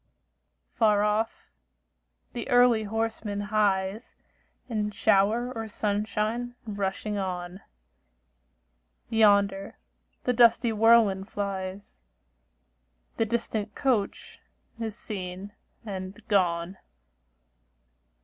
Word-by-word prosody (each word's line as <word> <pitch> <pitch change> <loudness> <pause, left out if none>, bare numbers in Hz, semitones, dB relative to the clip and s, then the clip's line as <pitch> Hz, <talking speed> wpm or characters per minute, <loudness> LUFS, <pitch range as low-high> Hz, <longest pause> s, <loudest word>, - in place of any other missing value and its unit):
Far 210 -2 +3
off, 210 - -1 0.8
the 240 +3 -5
early 245 -3 +5
horseman 220 -1 -2
hies, 205 0 0 0.5
In 215 -4 -1
shower 215 +4 +2
or 225 -2 -5
sunshine 215 +3 -2
rushing 205 0 -3
on; 180 0 -4 1.5
Yonder 200 -3 +3 0.5
the 250 - +1
dusty 235 0 +5
whirlwind 215 -3 +4
flies; 195 - -5 1.2
The 225 - +2
distant 220 -2 -2
coach 245 -7 -1 0.4
is 225 -1 -4
seen 190 -1 -6 0.3
and 190 0 -6
gone. 180 -2 +1
210 Hz, 80 wpm, -27 LUFS, 195-225 Hz, 1.5 s, early